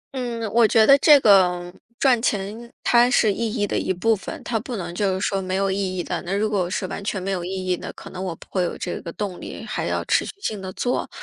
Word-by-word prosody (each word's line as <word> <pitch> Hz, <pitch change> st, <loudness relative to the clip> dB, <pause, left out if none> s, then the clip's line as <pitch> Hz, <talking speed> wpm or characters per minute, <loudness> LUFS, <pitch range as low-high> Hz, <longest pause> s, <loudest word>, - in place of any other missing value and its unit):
嗯， 240 Hz, -3 st, -3 dB
我 230 Hz, -1 st, +5 dB
觉 220 Hz, 0 st, +5 dB
得 275 Hz, -, +8 dB
这 295 Hz, -2 st, +7 dB
个， 180 Hz, -4 st, +4 dB, 0.2 s
赚 255 Hz, -4 st, +3 dB
钱 220 Hz, +2 st, -2 dB
它 240 Hz, 0 st, +5 dB
是 220 Hz, -4 st, +3 dB
意 230 Hz, +1 st, -2 dB
义 210 Hz, -2 st, 0 dB
的 -, -, -3 dB
一 -, -, -1 dB
部 220 Hz, +5 st, +2 dB
分， 195 Hz, -, -7 dB
它 230 Hz, -2 st, -1 dB
不 240 Hz, +3 st, -6 dB
能 175 Hz, -4 st, -5 dB
就 195 Hz, 0 st, 0 dB
是 -, -, -3 dB
说 195 Hz, -1 st, -1 dB
没 185 Hz, 0 st, -3 dB
有 195 Hz, 0 st, +1 dB
意 190 Hz, -1 st, -2 dB
义 175 Hz, -, -1 dB
的， -, -, -3 dB
那 180 Hz, -, -6 dB
如 215 Hz, +1 st, 0 dB
果 185 Hz, -4 st, 0 dB
是 185 Hz, -, -2 dB
完 195 Hz, -, -6 dB
全 200 Hz, -1 st, -2 dB
没 195 Hz, +2 st, -3 dB
有 180 Hz, -2 st, -2 dB
意 180 Hz, -, -5 dB
义 185 Hz, -1 st, -1 dB
的， -, -, -7 dB
可 -, -, -11 dB
能 185 Hz, 0 st, -6 dB
我 180 Hz, -3 st, -3 dB
不 -, -, -15 dB
会 185 Hz, -, 0 dB
有 175 Hz, -, -2 dB
这 175 Hz, -, -4 dB
个 170 Hz, -, -7 dB
动 195 Hz, -2 st, -5 dB
力 -, -, -8 dB
还 -, -, -3 dB
要 -, -, -2 dB
持 -, -, +2 dB
续 -, -, -6 dB
性 215 Hz, -, -3 dB
地 190 Hz, 0 st, -6 dB
做。 245 Hz, +5 st, -2 dB
195 Hz, 295 characters per minute, -23 LUFS, 185-225 Hz, 0.2 s, 得